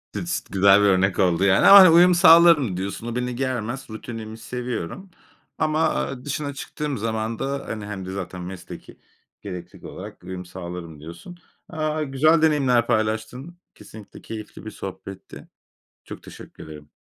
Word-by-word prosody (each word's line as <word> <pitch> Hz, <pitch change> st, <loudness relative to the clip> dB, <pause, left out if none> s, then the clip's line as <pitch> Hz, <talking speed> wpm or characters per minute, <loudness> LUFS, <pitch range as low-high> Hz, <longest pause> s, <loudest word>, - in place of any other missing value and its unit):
Düs 170 Hz, 0 st, -3 dB
güzel 100 Hz, +1 st, +5 dB
bir 105 Hz, -, +3 dB
örnek 95 Hz, 0 st, +2 dB
oldu, 90 Hz, -1 st, +2 dB
yani, 100 Hz, -1 st, +4 dB
ama, 200 Hz, -, +11 dB
hani, 185 Hz, -2 st, +9 dB
uyum 175 Hz, +2 st, +6 dB
sağlarım 165 Hz, -, +6 dB
diyorsun. 100 Hz, +4 st, -5 dB
O, 120 Hz, -, -5 dB
beni 125 Hz, 0 st, -3 dB
germez, 130 Hz, 0 st, -4 dB
rutinimi 110 Hz, 0 st, -8 dB
seviyorum 125 Hz, -, -6 dB, 0.5 s
ama, 155 Hz, +1 st, +1 dB
ııı, 130 Hz, -2 st, -8 dB
dışına 145 Hz, 0 st, -4 dB
çıktığım 145 Hz, 0 st, -5 dB
zaman 110 Hz, +1 st, -3 dB
da, 140 Hz, 0 st, -3 dB
hani, 110 Hz, -2 st, -6 dB
hem 100 Hz, -3 st, -7 dB
de 95 Hz, -, -6 dB
zaten 95 Hz, -1 st, -6 dB
mesleki 90 Hz, +1 st, -10 dB, 0.4 s
gereklilik 90 Hz, -3 st, -9 dB
olarak -, -, -10 dB
uyum 90 Hz, 0 st, -7 dB
sağlarım 85 Hz, -3 st, -9 dB
diyorsun. 85 Hz, -, -11 dB, 0.3 s
Aaa, 155 Hz, -2 st, -3 dB
a 155 Hz, -, -1 dB
güzel 150 Hz, +3 st, +2 dB
deneyimler 135 Hz, -7 st, +2 dB
paylaştın, 110 Hz, +8 st, -2 dB, 0.2 s
kesinlikle 110 Hz, -2 st, -14 dB
keyifli 110 Hz, -1 st, -9 dB
bir 110 Hz, -, -6 dB
sohbetti. 95 Hz, -1 st, -10 dB, 0.6 s
Çok -, -, -10 dB
teşekkür -, -, -13 dB
ederim. 75 Hz, -1 st, -12 dB
115 Hz, 155 wpm, -23 LUFS, 95-145 Hz, 0.6 s, ama